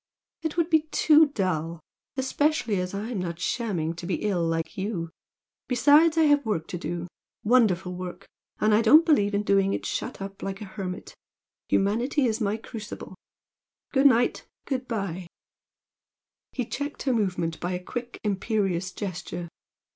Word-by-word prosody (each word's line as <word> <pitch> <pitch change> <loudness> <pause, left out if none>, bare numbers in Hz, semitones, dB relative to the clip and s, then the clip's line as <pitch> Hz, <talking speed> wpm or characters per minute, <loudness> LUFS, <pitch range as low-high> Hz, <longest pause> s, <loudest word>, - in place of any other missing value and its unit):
"It 320 0 -3
would 335 0 +1
be 315 -1 +3
too 310 0 +5
dull, 170 - -2 0.4
especially 265 -5 +1
as 180 +1 -3
I'm 215 +1 -3
not 170 -2 -4
shamming 180 -6 -1
to 170 0 -6
be 180 - -2
ill, 195 -5 +1
like 165 -1 -1
you. 190 -4 -3 0.6
Besides, 295 +6 +5
I 325 - +6
have 290 -1 +4
work 200 -9 -2
to 175 - -4
do! 170 +2 -4 0.4
wonderful 205 -6 +3
work! 180 0 -7 0.3
and 215 0 +3
I 215 - +5
don't 300 +9 +7
believe 205 -11 +3
in 205 - +1
doing 195 -1 +3
it - - -3
shut - - -3
up 195 0 -7
like 195 0 -4
a 210 - -6
hermit. 190 -2 -6 0.6
Humanity 235 +8 +2
is 230 0 0
my 210 0 0
crucible! 225 -1 -8 0.8
Good 275 0 +6
night, 245 -2 +2 0.2
good 255 -2 -3
bye!" 195 -6 -3 1.2
He 250 - -2
checked 285 +6 -4
her 265 - +1
movement 180 -7 -1
by 175 +1 -2
a 180 - -2
quick, 245 +4 -6
imperious 195 -3 0
gesture. 175 -2 -5
205 Hz, 155 wpm, -26 LUFS, 180-250 Hz, 1.2 s, don't